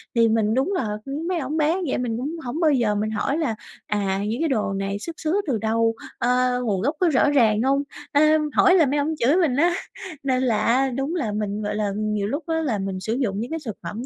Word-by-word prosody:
Thì 230 -1 +5
mình 220 -1 +2
đúng 270 - +1
là, 215 - -2
ưm, 290 +5 -4
mấy 360 -2 0
ổng 295 +2 -3
bán 320 +5 +1
vậy - - 0
mình 235 -3 -2
cũng 285 +7 -4
hổng 260 +7 -3
bao 315 -3 +4
giờ 230 -6 +2
mình 215 +1 -1
hỏi 275 +7 -1
là 285 -9 -1 0.3
"À, 195 -2 -1
những 230 +7 -2
cái 325 - +1
đồ 215 -6 0
này 195 +1 -3
xuất 330 +7 -7
xứ 335 +6 0
từ 245 -5 +1
đâu? 225 +1 +1 0.2
Ờ, 250 0 +1
nguồn 200 -5 0
gốc 290 +7 0
có 360 -2 +3
rõ 285 0 +3
ràng 225 -6 +3
hông?" 275 +2 +2 0.3
Ờ, 290 - +4 0.3
hỏi 370 -1 +5
là 330 -5 +5
mấy 285 +2 0
ổng 315 +3 -1
chửi 260 +7 +3
mình 325 -9 +2
á. 345 +5 +3 0.5
Nên 260 -1 +1
là 230 -4 +2
á 260 +3 +3
đúng 270 +6 -2
là 245 -12 -1
mình, 210 0 -3
gọi 210 0 -2
là, 210 -1 -1
nhiều 210 -1 -1
lúc 285 +8 -3
á 325 0 0
là 240 -9 -1
mình 195 -1 -3
sử 220 +4 -2
dụng 225 -6 -1
những 235 +5 -4
cái 325 - -2
thực 220 -4 -4
phẩm 210 +8 -5
250 Hz, 255 wpm, -23 LUFS, 215-295 Hz, 0.5 s, Thì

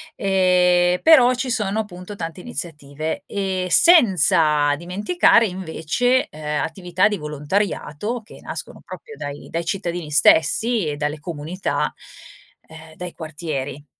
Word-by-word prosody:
ehm, 180 -2 +2
però 255 -6 +6
ci 255 +1 -3
sono 210 -3 -1
appunto 185 0 -10
tante 165 -1 -6
iniziative. 160 - -6
Ehm, 190 -2 -3
senza 175 - +4
dimenticare 210 - +2
invece, 190 +7 -1
ehm, 150 -1 -3
attività 180 +3 0
di 210 -1 -2
volontariato 160 - -3
che 215 - -15
nascono - - -7
proprio 450 -2 -11
dai 145 0 -8
dai 165 0 -3
cittadini 170 -3 -3
stessi 200 +7 +4
e 150 - -3
dalle 150 +1 -3
comunità, 165 +3 -3 0.7
ehm, 160 0 -14
dai 180 +1 -7
quartieri. 150 -3 -6
180 Hz, 120 wpm, -21 LUFS, 155-205 Hz, 0.7 s, però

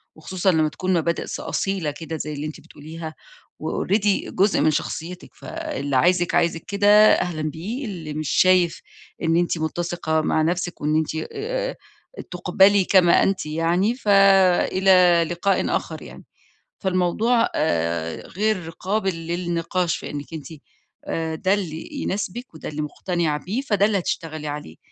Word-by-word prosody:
وخصوصًا 185 +4 0
لمّا 155 -2 +2
تكون 185 +4 -2
مبادئ 170 0 0
ص - - -5
أصيلة 190 -6 -2
كده 160 +2 -6
زي 150 0 -4
اللي 145 +1 -5
أنتِ 155 - -9
بتقوليها، 160 +1 -9 0.5
وalready 200 +5 0
جزء 200 +2 +2
من 155 - +4
شخصيتِك، 170 +4 -5
فاللي 300 - -4
عايزِك، 175 +5 +3
عايزِك 165 -1 +1
كده 205 0 0 0.3
أهلًا 165 -3 -1
بيه، 185 - -4
اللي 165 -7 -6
مش 155 -2 -3
شايف 185 -2 +3 0.4
إن 165 +1 +2
أنتِ 175 -1 +1
مُتّسِقة 160 0 -1
مع 155 - +1
نَفْسِك 175 +2 -2
وإن 150 +1 +1
أنتِ 160 0 0 0.2
آآ - - -3 0.6
تُقبلي 190 +2 +4
كما 180 -3 +5
أنتِ 195 -4 0
يعني، 170 +8 +1
فإلى 190 -4 +4
لقاءٍ 190 +3 +1
آخَر - - -4
يعني. - - -11 0.6
فالموضوع 195 +6 +1
آآ 85 - -1
غير 190 -4 -1
قابل 190 +2 -2
للنِقاش 175 0 -1
في - - -7
إنِّك 145 +2 -7
أنتِ 150 - -7 0.6
آآ 160 -1 -3
ده 185 +5 +1
اللي 165 -6 -4
يناسبِك 200 +2 -4
وده 160 - -7
اللي 150 0 -4
مُقتنعة 160 0 -2
بيه، 215 +8 -2
فده 205 -7 +2
اللي 205 -2 +1
هتشتغلي 155 -3 -4
عليه. 145 - -7
175 Hz, 145 wpm, -23 LUFS, 160-195 Hz, 0.6 s, كما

